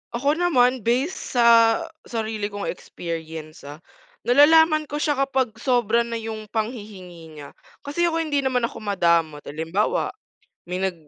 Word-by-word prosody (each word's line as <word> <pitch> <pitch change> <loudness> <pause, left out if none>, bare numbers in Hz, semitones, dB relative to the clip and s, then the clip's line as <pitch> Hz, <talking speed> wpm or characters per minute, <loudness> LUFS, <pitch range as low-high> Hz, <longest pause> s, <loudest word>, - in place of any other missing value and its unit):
Ako 285 +6 0
naman 255 -7 +3
base 260 +9 +2 0.2
sa 240 -1 +4 0.6
sarili 220 -3 -3
kong 205 -1 -7
experience, 160 -3 -8
ah, 150 +4 -11 0.4
nalalaman 310 +3 +5
ko 295 - -6
siya 295 -2 0
kapag 265 -3 0
sobra 235 -3 +2
na 230 - -4
'yung 220 -1 -6
panghihingi 200 -8 -6
niya. 145 -1 -10 0.3
Kasi 340 +5 0
ako 330 0 0
hindi 290 -2 0
naman 255 -3 0
ako 230 - -3
madamot, 170 -7 +1
halimbawa 165 - -1 0.6
may 180 +1 -5
nag 190 -1 -1
225 Hz, 140 wpm, -23 LUFS, 180-275 Hz, 0.6 s, nalalaman